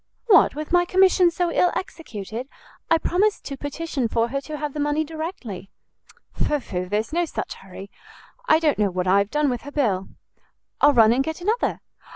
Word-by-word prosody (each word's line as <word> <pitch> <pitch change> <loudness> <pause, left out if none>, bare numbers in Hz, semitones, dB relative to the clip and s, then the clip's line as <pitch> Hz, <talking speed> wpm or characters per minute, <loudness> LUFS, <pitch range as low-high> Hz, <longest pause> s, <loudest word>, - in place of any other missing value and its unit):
"What, 410 - +5
with 305 +1 -6
my 350 0 +5
commission 370 0 +4
so 345 0 -1
ill 355 +1 +3
executed? 250 - -6 0.4
I 330 - +5
promised 395 +6 0
to 275 - -5
petition 285 -2 -3
for 230 +1 0
her 275 +2 -2
to 300 +3 -7
have 295 -1 -4
the 300 - -5
money 295 +1 +1
directly." 310 - -6 0.6
"Pho, 295 - 0
pho, 180 -7 -4
there's 210 +8 -2
no 345 +1 +1
such - - -5
hurry; 195 +1 -12 0.6
I 315 - +6
don't 310 -7 +1
know 205 -2 +3
what 180 0 -2
I 190 +2 +4
have 200 0 0
done 300 +2 +1
with 245 -3 -1
her 285 - -9
bill." 210 -11 0 0.7
"I'll 290 - +6
run 225 -3 +6
and 265 +3 +1
get 320 +3 -5
another." 430 +7 -1
290 Hz, 195 wpm, -23 LUFS, 220-330 Hz, 0.7 s, I